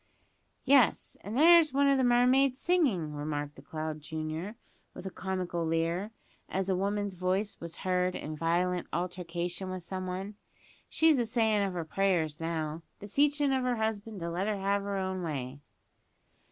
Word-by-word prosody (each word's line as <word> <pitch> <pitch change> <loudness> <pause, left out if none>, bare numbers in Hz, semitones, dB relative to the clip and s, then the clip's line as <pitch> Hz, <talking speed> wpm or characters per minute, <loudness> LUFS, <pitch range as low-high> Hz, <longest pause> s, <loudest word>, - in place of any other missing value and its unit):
"Yes, 270 -4 +4
and 210 +4 -4
there's 330 0 +7
one 280 +1 +3
o' 275 - +5
the 265 - +2
mermaids 250 +2 +4
singing," 250 - +1
remarked 145 0 -3
the - - -12
clown 155 +1 -5
junior, 160 +6 -5 0.4
with 180 - -9
a 190 - -4
comical 180 -3 -3
leer, 165 +4 0 0.4
as 190 0 -2
a 190 - +2
woman's 200 +1 -1
voice 185 +3 -1
was 170 0 -6
heard 180 0 +1
in 155 +1 -5
violent 175 +3 0
altercation 175 +1 -3
with 185 -1 -5
some 185 +1 -4
one. 190 +3 -5 0.5
"She's 320 -4 +4
a 240 - +1
sayin' 220 -3 +2
of 195 -2 -1
her 170 -2 -3
prayers 165 -4 0
now; 160 -1 -3 0.2
beseechin' 285 +7 +2
of 260 -1 +1
her 250 -1 +1
husband 220 -1 -3
to 170 0 -3
let 185 +4 -1
her 215 -1 0
have 200 +1 0
her 200 0 -3
own 190 -1 -2
way." 140 -5 -4
185 Hz, 165 wpm, -30 LUFS, 170-220 Hz, 0.5 s, there's